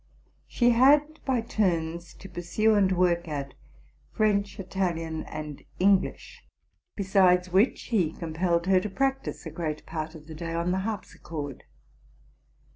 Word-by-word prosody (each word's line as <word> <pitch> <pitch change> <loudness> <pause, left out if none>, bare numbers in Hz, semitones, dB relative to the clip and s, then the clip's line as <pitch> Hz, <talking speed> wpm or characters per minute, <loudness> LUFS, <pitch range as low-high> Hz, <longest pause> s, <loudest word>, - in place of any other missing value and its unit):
She 240 -1 +3
had 290 +6 +4
by 255 -3 +1
turns 170 -6 -1
to 195 - -11
pur 175 -2 -7
sue 215 +6 +2
and 200 -2 +3
work 175 -2 +2
at 140 -3 -4 0.6
French, 205 -3 +1
Italian, 170 -4 -2
and 150 -2 -7
English; 195 +1 +1 0.5
besides 185 -2 +3
which 195 +8 +3
he 185 -9 +2
compelled 170 +1 -1
her 190 0 +4
to 210 - -4
practise 270 +5 -2
a - - -5
great 155 -3 -4
part 160 0 -5
of 155 -1 -12
the 160 - -9
day 165 +1 -5
on 170 +1 0
the 190 - +1
harpsichord. 165 - -6
180 Hz, 140 wpm, -27 LUFS, 165-205 Hz, 0.6 s, had